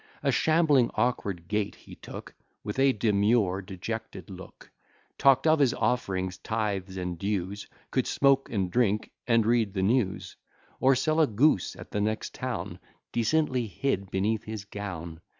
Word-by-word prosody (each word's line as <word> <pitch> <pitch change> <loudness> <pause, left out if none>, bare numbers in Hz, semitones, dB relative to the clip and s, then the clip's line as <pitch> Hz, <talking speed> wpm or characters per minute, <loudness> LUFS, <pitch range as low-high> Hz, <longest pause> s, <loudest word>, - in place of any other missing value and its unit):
A - - +3
shambling 155 -6 +3
awkward 100 -7 -1
gait 105 -1 -1
he - - -14
took, - - -10 0.3
With 105 +5 -4
a 135 0 +5
demure 105 -3 +2
dejected 100 +3 -6
look, 95 -1 -12 0.5
Talk't 135 +1 +5
of 155 -1 +4
his 135 -4 +3
offerings, 95 -7 -1
tythes, 100 -4 -2
and 90 -2 -4
dues, 100 0 -3 0.2
Could - - 0
smoke 135 -1 +3
and 95 -5 -1
drink 105 -3 +1 0.2
and 115 -2 +3
read 115 -3 +2
the 95 - 0
news, 105 -2 0 0.4
Or 135 +1 +5
sell 155 +5 +1
a 155 - +5
goose 115 - +2
at - - -11
the 105 - -1
next 110 +1 -2
town, 130 -2 -4 0.3
Decently 125 0 +1
hid 100 -4 -2
beneath 105 +4 0
his 110 -2 -6
gown. 85 -6 -7
110 Hz, 150 wpm, -28 LUFS, 95-125 Hz, 0.5 s, a